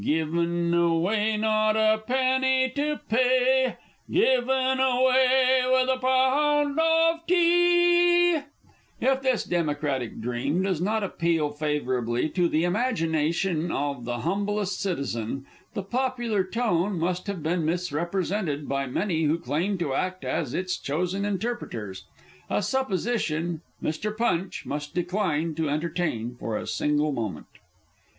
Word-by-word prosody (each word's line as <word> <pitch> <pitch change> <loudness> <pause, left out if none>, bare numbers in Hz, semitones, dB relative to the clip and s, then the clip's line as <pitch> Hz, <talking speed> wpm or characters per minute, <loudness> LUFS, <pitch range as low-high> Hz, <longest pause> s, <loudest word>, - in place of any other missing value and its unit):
Given 170 +3 0
away! 180 +6 +2
Not 215 0 +2
a 220 0 +3
penny 260 +2 +1
to 295 +1 -1
pay! 255 +2 +2 0.3
Given 260 +1 +2
away! 260 0 +4
with 260 0 +3
a - - -10
Pound 285 +3 +2
of 325 +1 +2
Tea! 350 0 +4 0.6
If 265 0 +1
this 260 -3 +1
Democratic 145 -7 -2
Dream 125 +9 -1
does 185 -4 -1
not 215 +3 0
appeal 165 -5 0
favourably 135 -4 -1
to 175 0 +1
the 155 +2 +1
imagination 170 -5 0
of 140 -4 -3
the 120 0 -3
humblest 200 +2 -1
citizen, 135 - -3 0.3
the 200 - -3
popular 240 -2 -1
tone 190 -2 0
must 180 +3 -2
have 195 -6 -4
been 165 +1 0
misrepresented 170 -1 -2
by 140 0 -1
many 165 +3 -1
who 155 +2 +2
claim 170 +6 -1
to 160 -6 -2
act 185 +5 -2
as 140 -7 -2
its 185 0 -2
chosen 180 +7 -2
interpreters 190 - -4 0.4
a - - 0
supposition 185 - -1 0.2
Mr. 210 +7 -3
Punch 190 -5 -1
must 145 +1 -5
decline 175 -3 -1
to 160 -1 -2
entertain 150 -6 -2
for 110 -2 -3
a - - -5
single 150 0 0
moment. 110 - -4
185 Hz, 125 wpm, -26 LUFS, 155-255 Hz, 0.6 s, away